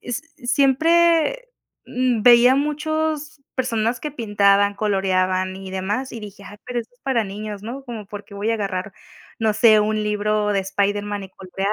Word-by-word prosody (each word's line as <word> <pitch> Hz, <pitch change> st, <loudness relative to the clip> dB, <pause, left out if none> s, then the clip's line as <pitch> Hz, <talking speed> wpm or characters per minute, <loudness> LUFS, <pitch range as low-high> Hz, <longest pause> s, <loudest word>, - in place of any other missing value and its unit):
es 245 Hz, +3 st, -5 dB
siempre, 330 Hz, -, +2 dB, 0.4 s
mm, 250 Hz, -3 st, 0 dB
veía 245 Hz, +2 st, +7 dB
muchos 305 Hz, 0 st, -2 dB
personas 235 Hz, -2 st, -1 dB
que 300 Hz, -, -4 dB
pintaban, 205 Hz, -4 st, +2 dB
coloreaban 185 Hz, -2 st, 0 dB
y 190 Hz, -1 st, -9 dB
demás. 205 Hz, +8 st, -3 dB
Y 230 Hz, -, -7 dB
dije: 200 Hz, -1 st, -11 dB
"Ah, 205 Hz, -, -11 dB
pero 245 Hz, -1 st, -3 dB
esto 240 Hz, +2 st, -14 dB
es 245 Hz, -, -35 dB
para 255 Hz, -5 st, 0 dB
niños", 205 Hz, 0 st, -7 dB
¿no? 250 Hz, +5 st, -6 dB
Cómo 225 Hz, -5 st, -7 dB
por 205 Hz, 0 st, -8 dB
qué 200 Hz, -, -14 dB
voy 205 Hz, +3 st, -1 dB
a 230 Hz, -, +2 dB
agarrar, 195 Hz, -2 st, -3 dB, 0.5 s
no 220 Hz, -1 st, +2 dB
sé, 215 Hz, -1 st, +6 dB
un 215 Hz, +1 st, 0 dB
libro 210 Hz, 0 st, 0 dB
de 200 Hz, -, +1 dB
Spider-Man 205 Hz, +1 st, -2 dB
y 190 Hz, -, -12 dB
colorear 195 Hz, +2 st, -3 dB
215 Hz, 175 wpm, -21 LUFS, 200-255 Hz, 0.5 s, veía